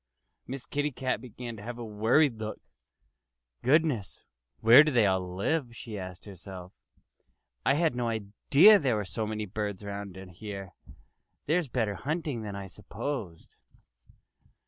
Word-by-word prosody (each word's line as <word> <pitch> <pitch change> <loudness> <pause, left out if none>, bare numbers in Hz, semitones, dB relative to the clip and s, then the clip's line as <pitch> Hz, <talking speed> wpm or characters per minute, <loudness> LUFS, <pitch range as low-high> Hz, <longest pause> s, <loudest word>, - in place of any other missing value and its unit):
Miss 130 0 -6
Kitty 145 +1 -1 0.3
began 120 -1 -8
to - - -10
have 120 +3 -6
a 120 - -6
worried 115 +4 +2
look. 110 0 -5 1.0
"Goodness! 140 -7 +1 0.4
Where 120 +6 +9
do 155 - 0
they 120 -5 +4
all 95 -2 0
live?" 120 - -1
she 115 -2 -8
asked 95 -2 -7
herself. 95 -2 -10 0.9
"I 135 - +5
had 160 -4 +2
no 120 -1 -1
idea 115 - +5
there 130 -6 +1
were 105 -1 -2
so 110 +3 -3
many 110 0 -3
birds 105 0 -4
around 100 -1 -6
here. 95 0 -8 0.7
There's 165 +1 +1
better 115 -5 0
hunting 145 - -3
than 105 -2 -5
I 100 0 -5
supposed." 105 - -6
110 Hz, 140 wpm, -29 LUFS, 100-130 Hz, 1.0 s, Where